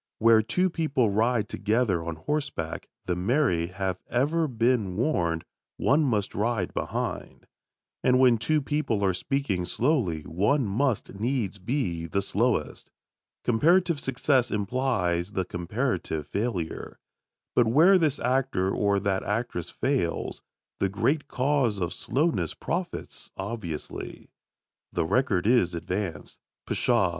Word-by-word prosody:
Where 115 0 +6
two 180 +11 +1
people 140 -10 +1
ride 110 +1 +1
together 105 -5 0
on 85 -1 -4
horseback, 135 - -3 0.2
the 90 - 0
married 90 - +1
have 95 -2 -2
ever 150 +7 +1
been 115 -6 +1
warned, 85 - 0 0.3
one 145 +4 +3
must 110 -8 0
ride 105 -3 -1
behind. - - -4 0.6
And 125 0 +4
when 125 -3 +5
two 150 +6 +1
people 135 -9 0
are 95 - +2
speaking 100 -2 -1
slowly 110 - 0
one 110 - +1
must 115 +4 0
needs 110 -4 -1
be 90 - -2
the 100 +4 -1
slowest. - - -1 0.5
Comparative 165 +7 +3
success 135 -1 +1
implies 100 -5 0
the 95 - -1
comparative 90 - -2
failure. 100 -3 -3 0.6
But 120 - +4
where 170 +11 +6
this 150 -4 +2
actor 125 -7 +1
or 100 0 +2
that 95 -1 0
actress 105 -5 -2
fails, 130 -11 -1 0.4
the 95 - +1
great 140 +9 0
cause 130 -5 +1
of 85 -1 -2
slowness 155 +6 0
profits, 175 +1 -4
obviously. 95 -6 -6 0.6
The 85 - 0
record 100 -2 +1
is 105 -7 +3
advanced. 85 -2 -4 0.3
Pshaw! - - +2
110 Hz, 125 wpm, -27 LUFS, 95-135 Hz, 0.6 s, Where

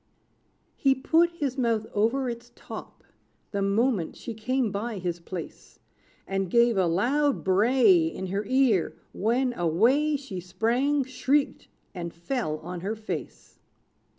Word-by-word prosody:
He 270 -1 +3
put 325 +6 +3
his 285 -6 -3
mouth 230 -3 +1
over 235 +6 +1
its 240 0 -6
top, - - -10 0.5
The 200 - -1
moment 200 -2 +1
she 230 - -7
came 230 +1 -1
by 210 +2 -3
his 175 -2 -3
place; 170 0 -8 0.5
And 195 -1 -1
gave 235 +2 +4
a 190 -2 +2
loud 265 - +1
bray 195 -3 +4
In 190 - -5
her 195 +3 -2
ear, 255 -7 +2 0.2
when, 245 +5 +1
away 235 - +2
She 265 -10 -5
sprang, 235 +11 0
shrieked, 265 +3 0 0.3
and 170 -3 -5
fell 170 - -3
on 175 +2 -6
her 200 +5 -3
face. 220 0 -7
225 Hz, 135 wpm, -27 LUFS, 190-260 Hz, 0.5 s, gave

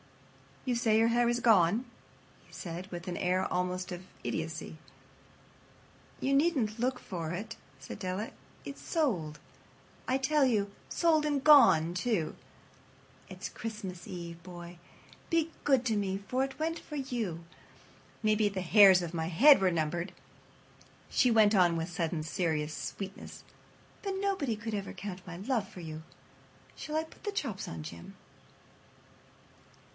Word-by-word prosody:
"You 255 - +1
say 225 -2 +3
your 225 +1 +5
hair 240 +1 +3
is 240 0 +1
gone?" 220 0 +4 0.6
he - - -21
said, 175 0 -6
with 175 +1 -7
an 175 - -3
air 185 +1 0
almost 180 0 -1
of 180 0 -6 0.2
idiocy. 160 0 -4 1.4
"You 275 - 0
needn't 275 -8 +2
look 250 +2 0
for 165 -3 -5
it," 215 +6 -5 0.2
said - - -8
Della. 190 +3 -3 0.4
"It's 280 - -8
sold, 180 - -1 0.7
I 260 - +2
tell 285 +1 +3
you—sold 255 +8 +1
and 290 -2 0
gone, 175 - +7
too. 180 -5 0 0.9
It's - - -6
Christmas 195 -6 -7
Eve, 170 -2 -7
boy. 175 -1 -10 0.5
Be 330 -1 +2
good 270 -4 +3
to 225 -3 +1
me, 195 -2 -1
for 255 +1 +1
it 270 0 -5
went 325 +1 -1
for 300 - -9
you. 235 - -3 0.8
Maybe 215 0 +3
the 195 -2 -4
hairs 190 0 +7
of 170 0 -5
my 160 -1 -1
head 250 - +7
were 185 -1 +3
numbered," 170 +2 -2 1.0
she 250 - +3
went 215 -2 +5
on 175 -3 +4
with 165 +1 -2
sudden 165 -1 -2
serious 155 -2 -1
sweetness, 195 -1 -7 0.6
"but 395 -1 -2
nobody 385 - 0
could 220 +1 -6
ever 200 -2 -3
count 185 -2 -7
my 175 -1 -7
love 215 +1 -1
for 185 - -12
you. 160 -1 -7 0.7
Shall 305 - -6
I 315 - +1
put 320 - -17
the 410 - -2
chops 260 - -3
on, 80 -1 -6
Jim?" 85 +2 -9
200 Hz, 145 wpm, -31 LUFS, 175-255 Hz, 1.4 s, gone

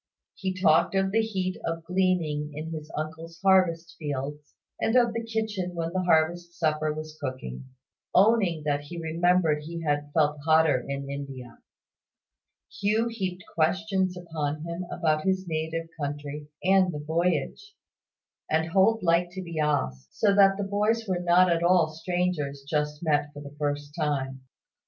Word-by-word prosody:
He 185 -1 -4
talked 170 +1 +4
of 190 0 +2
the 225 +2 +3
heat 190 -4 -2
of 165 0 -3
gleaning 165 -5 0
in 155 +2 -5
his 155 -1 -6
uncle's 160 +2 -6
harvest 180 -3 +3
fields, 145 0 -5 0.2
and 225 - +1
of 240 -2 +4
the 230 0 -3
kitchen 220 -5 -3
when 165 0 -3
the 185 - +1
harvest 175 0 +1
supper 155 -2 +1
was 155 0 -7
cooking; 130 - -5 0.5
owning 195 -6 +3
that 145 -1 0
he 170 +4 -8
remembered 165 -1 +2
he 165 +2 -6
had 145 -1 0
felt 150 -1 +2
hotter 160 -3 +4
in 140 0 -4
India. 135 -4 -7 1.2
Hugh 215 +4 +2
heaped 185 -5 -4
questions 185 +2 +1
upon 155 -3 -3
him 170 +2 -4
about 155 -3 +1
his 190 -1 0
native 160 0 -2
country 145 +1 -4 0.2
and 190 -1 +4
the 150 - -5
voyage; 170 - -1 0.7
and 160 +1 +1
Holt 200 +5 +3
liked 175 +1 +2
to 190 0 -5
be 170 -2 -5
asked: 65 - -1
so 205 -2 +4
that 195 -1 +5
the 205 - -2
boys 210 +3 +1
were 185 -2 0
not 175 +1 +4
at 170 0 +2
all 175 -1 +5
like 155 - -12
strangers 165 -6 -2
just 150 +1 -1
met 145 -2 +1
for 145 - -9
the 140 0 -11
first 145 0 -2
time. 135 -4 -2
165 Hz, 160 wpm, -27 LUFS, 150-185 Hz, 1.2 s, that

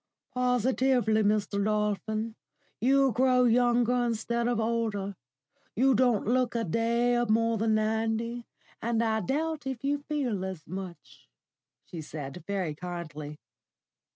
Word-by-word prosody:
"Positively, 250 -2 +2
Mr. 205 -1 +1
Dolphin, 215 +1 -1 0.5
you 270 +2 +4
grow 250 +2 +3
younger 245 0 +3
instead 235 0 -1
of 240 -1 0
older. 220 -3 -1 0.6
You 265 +4 +4
don't 240 -3 +2
look 250 +1 +1
a 230 - +1
day 235 +5 +1
more 230 0 +2
than 220 0 +2
ninety, 225 +2 -1 0.3
and 230 0 +1
I 220 -1 +1
doubt 305 +3 -2
if 265 -2 -4
you 285 +1 0
feel 275 -9 -2
as 190 -5 -6
much," 185 0 -9 0.6
she 170 - -7
said, 150 +1 -7
very 190 -6 -1
kindly. 155 -3 -7
230 Hz, 125 wpm, -28 LUFS, 205-245 Hz, 0.6 s, you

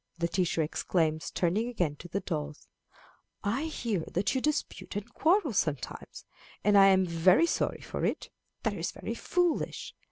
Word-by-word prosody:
the 170 0 0
teacher 170 -2 +1
exclaims, 155 0 0
turning 190 +7 0
again 175 -11 -1
to 175 - -11
the 200 +3 -2
dolls. 150 -3 -5 0.8
"I 235 +9 0
hear 235 - -2
that 185 +4 +1
you 260 - 0
dispute 300 -7 -2
and 205 0 -5
quarrel 330 - +2
sometimes, 150 -9 -3 0.4
and 205 0 +4
I 195 -1 +8
am 190 -1 +5
very 180 - +4
sorry - - -1
for - - -5
it. - - -1 0.3
That - - +1
is - - -2
very - - -5
foolish. 355 -2 -1
190 Hz, 160 wpm, -30 LUFS, 165-240 Hz, 0.8 s, I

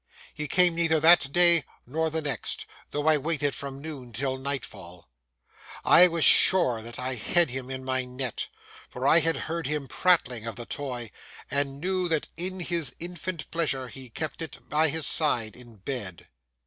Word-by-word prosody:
He 150 0 -4
came 180 +3 +4
neither 165 -1 +2
that 160 -3 +6
day 170 -1 +5 0.2
nor 160 +6 -1
the 160 0 -3
next, 140 -6 -3 0.2
though 145 0 -3
I 155 -1 +5
waited 145 -1 -1
from 140 -1 -6
noon 140 -5 -8
till 130 +2 -2
nightfall. 100 - -5 0.8
I 180 - +8
was 165 -2 +1
sure 125 -12 +5
that 115 +1 -7
I 130 +1 -3
had 145 +6 +1
him 130 0 -6
in 130 0 -6
my 130 0 0
net, 125 -1 -3 0.4
for 130 +2 -3
I 160 - +7
had 165 0 +1
heard 165 +3 -4
him 150 -2 -3
prattling 130 -12 +1
of 115 - -5
the 120 - -7
toy, 125 -6 -5 0.4
and 140 -1 -1
knew 185 +1 -1
that 160 -2 -1
in 185 +2 -3
his 170 -7 -2
infant 175 -1 -6
pleasure 135 -6 -1
he 130 +1 -11
kept 155 +7 -5
it 160 - -8
by 155 +1 +2
his 160 0 0
side 120 -10 +2
in 120 -2 -15
bed. 100 - -6
145 Hz, 175 wpm, -26 LUFS, 125-165 Hz, 0.8 s, I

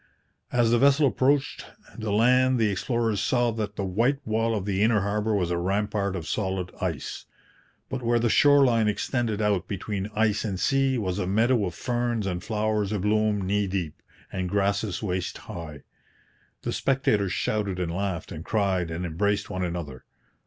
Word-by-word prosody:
As 120 -2 +3
the 120 - +4
vessel 140 +3 +5
approached 135 +1 +1 0.3
the 110 -2 -4
land 125 +4 +4
the 110 -3 +2
explorers 115 +1 0
saw 120 -2 +2
that 105 -2 -4
the 100 - -2
white 115 +9 +1
wall 115 +1 0
of 100 -3 -3
the 100 -1 -1
inner 110 -1 +3
harbour 105 +2 0
was 90 -3 0
a 85 - 0
rampart 100 +1 -1
of 85 -4 -5
solid 95 -3 -2
ice; 85 -8 -4 0.6
but 130 -1 -4
where 120 0 +2
the 120 0 +2
shore 145 +4 +5
line 115 -3 +3
extended 110 0 -1
out 100 -4 +1
between 100 0 -4
ice 105 -1 +2
and 100 -5 -3
sea 135 +2 +2
was 95 -3 -2
a 90 - -1
meadow 110 +3 +2
of 85 - -6
ferns 120 -1 -1
and 90 -2 -3
flowers 105 -2 -1
abloom 105 0 +1
knee 100 +1 +1
deep, 90 -5 -4 0.3
and 95 -1 -3
grasses 100 0 0
waist 90 -3 -2
high. 85 -8 -8 0.8
The - - -2
spectators 110 -8 +1
shouted 100 -3 -1
and 85 -2 -2
laughed 95 -2 -3
and 80 -2 -6
cried 95 -5 0
and 85 +2 -4
embraced 100 +5 -1
one 95 -2 -2
another. 85 -7 -5
105 Hz, 175 wpm, -26 LUFS, 95-115 Hz, 0.8 s, vessel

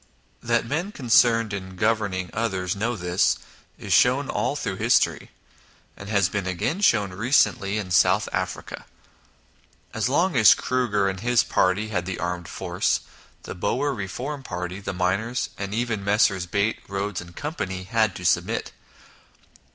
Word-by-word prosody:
That 120 0 +1
men 160 - -2
concerned 115 - +3
in 95 -1 -6
governing 100 -3 0
others 95 -4 -1
know 115 +4 -1
this, 90 -1 +1 0.4
is - - -2
shown - - +3
all - - -1
through - - -3
history, - - +2 0.7
and 100 - -10
has 100 -4 +3
been 100 -1 -3
again 95 - -2
shown 105 - +3
recently 110 -1 +2
in 100 -4 -4
South 85 - +4
Africa. - - -4 1.1
As 110 +2 0
long 170 +5 +2
as 110 -4 +7
Kruger 115 -6 0
and 95 -1 -3
his 120 +3 +3
party 100 +4 +1
had 90 -4 -2
the 95 - -3
armed 90 -1 -3
force, - - -1 0.4
the - - -6
Boer 135 +10 -1
reform 125 +7 -5
party, 90 -4 -5
the 100 - -4
miners, 100 +7 -1
and 100 -1 -5
even 110 -2 -2
Messrs. 100 -3 +2
Beit, 100 +4 0
Ehodes, 100 -1 -3
& - - -28
Co., 150 +1 -4 0.4
had 110 -4 +2
to 90 - -7
submit. 90 - 0
105 Hz, 150 wpm, -24 LUFS, 95-120 Hz, 1.1 s, as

